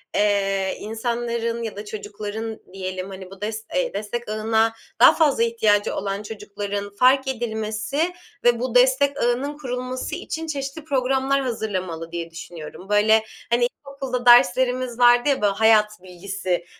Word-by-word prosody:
eee, 195 -2 +1
insanların 235 +1 -2
ya 220 - -5
da 205 +1 -7
çocukların 210 +1 -6
diyelim, 185 0 -5
hani, 190 -1 -9
bu 195 +1 -13
des 220 +1 -4
eee, 265 -5 0
destek 215 +3 -4
ağına 220 +1 +1 0.3
daha - - +9
fazla 290 -7 +3
ihtiyacı 215 -3 +2
olan 200 +1 -3
çocukların 205 -1 -5
fark 260 +5 +3
edilmesi 230 +6 -2 0.3
ve 240 -1 +4
bu 250 -1 -3
destek 265 +3 +4
ağının 265 +5 0
kurulması 255 -2 -4
için 325 0 -5
çeşitli 280 0 -4
programlar 270 -1 +1
hazırlamalı 185 -9 -3
diye 170 -1 -5
düşünüyorum. 170 +2 -10
Böyle, 215 +1 +4 0.3
hani, 240 +1 +3 0.2
ilkokulda 265 -3 -4
derslerimiz 250 0 +4
vardı 245 +3 +5
ya, 270 - +1
ba 200 0 +1
hayat 215 -1 +5
bilgisi 185 -1 -3
225 Hz, 140 wpm, -23 LUFS, 205-255 Hz, 0.3 s, daha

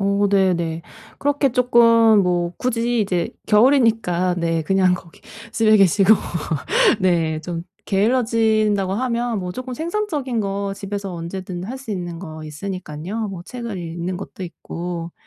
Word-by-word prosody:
오. 200 +1 +2
네네. 170 -4 +1 0.4
그렇게 285 -2 +1
쪼끔 230 -3 +5
뭐 175 -1 0
굳이 240 -1 0
이제 180 -4 -1 0.2
겨울이니까 220 -7 +3
네. 165 -1 0
그냥 185 +1 +3
거기 170 -2 -11 0.3
집에 220 -1 +4
계시고 195 +1 +5 0.9
네. 165 -4 +1
좀 170 0 -5 0.2
게을러진다고 215 -2 +2
하면 235 -1 -1
뭐 180 -1 -4
쪼금 255 +4 -6
생산적인 320 - -2
거 200 -1 -2
집에서 200 -1 -5
언제든 175 +1 -6
할 250 +7 -6
수 260 -5 -6
있는 175 -3 -5
거 160 -3 -8
있으니깐요, 185 +5 -5
뭐 185 -3 -7
책을 235 -5 -6
읽는 170 +1 -4
것도 195 0 -8
있고. 170 -1 -6
195 Hz, 280 characters per minute, -21 LUFS, 175-230 Hz, 0.9 s, 쪼끔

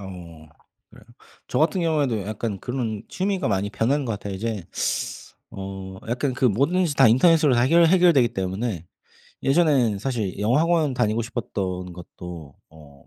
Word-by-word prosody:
어 85 -5 -10 0.4
그래요. - - -17 0.4
저 125 - -1
같은 170 +4 +2
경우에도 145 -9 0
약간 110 0 -4
그런 115 -5 -3
취미가 190 - -1
많이 100 0 0
변한 135 +7 0
것 115 - -2
같아요. 100 -1 -5
이제 105 -2 -4 0.9
어 95 -1 -7
약간 125 +2 -1
그 130 - -2
뭐든지 145 - +2
다 135 -4 +6
인터넷으로 150 +3 +4
다 120 - +3
해결 165 +5 +5
해결되기 170 -8 +5
때문에 95 -2 -3 0.6
예전에는 135 - +3
사실 110 -6 -3
영어학원 150 +6 +2
다니고 115 -1 0
싶었던 95 -6 -4
것도 85 0 -10 0.6
뭐 75 -3 -18
115 Hz, 320 characters per minute, -23 LUFS, 95-145 Hz, 0.9 s, 다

